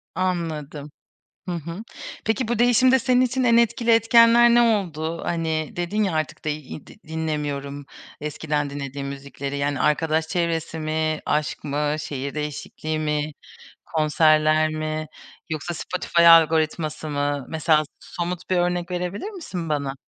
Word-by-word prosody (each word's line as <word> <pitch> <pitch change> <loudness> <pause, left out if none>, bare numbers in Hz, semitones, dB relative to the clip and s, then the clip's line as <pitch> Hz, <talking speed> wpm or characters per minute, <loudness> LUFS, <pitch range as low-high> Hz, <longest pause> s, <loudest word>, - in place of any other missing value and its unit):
Anladım. 160 -5 -3 0.6
Hı - - -2
hı. 170 +6 -6 0.4
Peki, 220 +2 0
bu 235 -1 -1
değişimde 250 +2 +5
senin 250 +2 +3
için 255 +1 +1
en 235 -1 +5
etkili 235 0 +2
etkenler 230 +1 +6
ne 240 0 +5
oldu? 170 -8 0
Hani 160 -2 -2
dedin 180 +5 -1
ya, 190 -5 0
artık 155 0 -3
de 155 - +1
id 150 0 -9 0.2
dinlemiyorum 145 -3 -3 0.4
eskiden 150 -1 -2
dinlediğim 140 0 -5
müzikleri, 140 0 -6
yani, 140 -1 -1
arkadaş 160 +1 +1
çevresi 165 -2 -2
mi, 155 0 -1
aşk 150 0 -1
mı, 150 +1 -1
şehir 140 -1 -5
değişikliği 150 +1 -4
mi, 150 0 -1 0.5
konserler 155 0 +3
mi 155 0 -3 0.4
yoksa 160 +2 -3
Spotify 170 0 +1
algoritması 160 -1 +4
mı? 145 -2 -1
Mesela, 160 -1 +3 0.2
so 175 - -5
somut 180 +1 -5
bir 185 - +2
örnek 175 0 0
verebilir 180 - -3
misin, 185 - -6
bana? 140 -2 -1
155 Hz, 135 wpm, -23 LUFS, 150-180 Hz, 0.6 s, etkenler